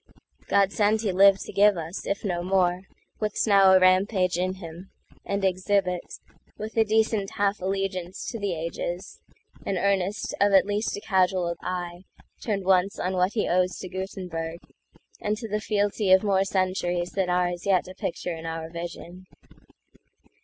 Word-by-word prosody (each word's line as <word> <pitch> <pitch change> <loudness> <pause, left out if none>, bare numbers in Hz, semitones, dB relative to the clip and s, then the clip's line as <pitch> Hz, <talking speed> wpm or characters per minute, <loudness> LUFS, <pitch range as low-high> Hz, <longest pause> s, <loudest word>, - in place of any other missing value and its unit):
God 200 -1 +3
send 215 +1 +2
he 210 -4 0
live 195 +1 +6
to - - -8
give 205 -1 +5
us, 165 +3 -6
if 200 +2 -2
no 175 -3 -1
more, 185 0 +1 0.3
What 215 -1 -1
now's 195 -3 +6
a - - +7
rampage 185 0 +3
in 185 +1 -1
him, 175 0 -10 0.4
and 200 0 -1
exhibit, 185 -1 +1 0.6
With 215 +1 -7
a 225 - +5
decent 220 -2 +1
half 200 +1 +1
allegiance 190 -1 -3
to 230 - -6
the 200 -3 -1
agesAn 175 +3 -6
earnest 200 +1 0
of 200 0 +4
at 190 - +6
least 205 +1 -2
a - - -7
casual 185 -3 +1
eyeTurned 180 +3 -5
once 190 +1 +2
on 185 - -2
what 185 +1 +1
he 220 - 0
owes 180 0 +1
to 185 - -7
Gutenberg, 180 -3 -5 0.6
And 210 0 -1
to 225 0 -6
the 210 0 -2
fealty 205 -1 0
of 190 +1 +6
more 195 -2 +2
centuriesThan 185 -1 -1
are 180 0 +2
as 175 +2 -6
yet 185 -3 +2
a 185 - -9
picture 180 -1 -4
in 165 0 -7
our 165 0 -5
vision. 175 +2 -8
190 Hz, 160 wpm, -26 LUFS, 180-200 Hz, 0.6 s, a